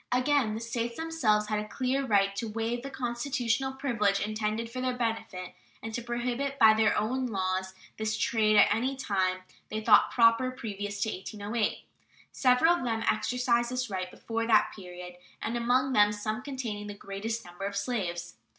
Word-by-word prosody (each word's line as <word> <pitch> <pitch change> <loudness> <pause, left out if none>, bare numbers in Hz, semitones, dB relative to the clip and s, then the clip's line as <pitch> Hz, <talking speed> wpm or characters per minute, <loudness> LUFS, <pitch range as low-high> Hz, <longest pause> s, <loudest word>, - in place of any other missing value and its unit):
Again, 255 -3 +2
the - - -3
States 235 0 -3
themselves 255 -11 +1
had 215 -1 0
a 210 - -5
clear 260 +4 -1
right 200 -5 +2
to 230 - -2
waive 225 +2 -2
the 275 - -6
constitutional 250 0 -1
privilege 230 -8 +1
intended 215 +2 -2
for 255 +2 -5
their 255 -1 -1
benefit, 225 -6 -3 0.3
and 225 0 -5
to 240 - -2
prohibit 245 +3 -2
by 220 -3 +7
their 220 -1 +3
own 255 +5 0
laws 190 -3 -2 0.2
this 220 0 -1
trade 215 -2 +2
at 205 - +6
any 255 +5 -1
time 190 -7 -1 0.3
they 215 - -2
thought 215 -1 +5
proper 230 +2 +4
previous 205 -5 -5
to 220 - -1
1808. 210 +3 -3 0.5
Several 255 +6 +4
of 345 - -2
them 225 -2 -1
exercised 240 +1 +1
this 250 -2 -3
right 185 -1 -3
before 230 +4 -4
that 220 -2 +4
period, 180 -2 -9 0.2
and 225 - -3
among 250 +3 +2
them 210 -2 +5
some 215 +2 -3
containing 240 -7 -5
the 205 - -6
greatest 210 +4 -5
number 175 +2 -7
of 200 0 -3
slaves. 175 - -3
225 Hz, 175 wpm, -29 LUFS, 205-250 Hz, 0.5 s, by